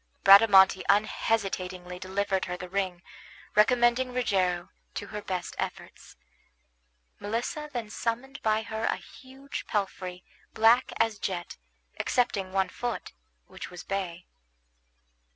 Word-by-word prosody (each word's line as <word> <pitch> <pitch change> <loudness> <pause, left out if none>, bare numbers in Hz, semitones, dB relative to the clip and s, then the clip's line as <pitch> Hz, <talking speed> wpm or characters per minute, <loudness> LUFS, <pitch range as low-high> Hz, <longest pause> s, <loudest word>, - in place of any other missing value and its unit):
Bradamante 195 -1 +8
unhesitatingly 190 -4 0
delivered 190 +1 -1
her 180 0 -4
the 180 - -7
ring, 185 -2 -2 0.5
recommending 240 +3 +4
Rogero 185 -7 0 0.3
to - - -4
her 210 0 -6
best 185 -4 -4
efforts. - - -6 1.0
Melissa 240 +8 -3
then 230 -5 -5
summoned 245 +5 -3
by 220 0 +1
her 220 0 -3
art - - +2
a - - -2
huge 270 +2 -9
palfrey, 185 -3 -3 0.3
black 230 +3 +5
as 225 -2 +1
jet, 175 -3 -4 0.4
excepting 205 -7 0
one 190 -1 +1
foot, 240 +4 -4 0.3
which - - -9
was 180 - -9
bay. 180 -3 -4
200 Hz, 115 wpm, -28 LUFS, 185-230 Hz, 1.0 s, Bradamante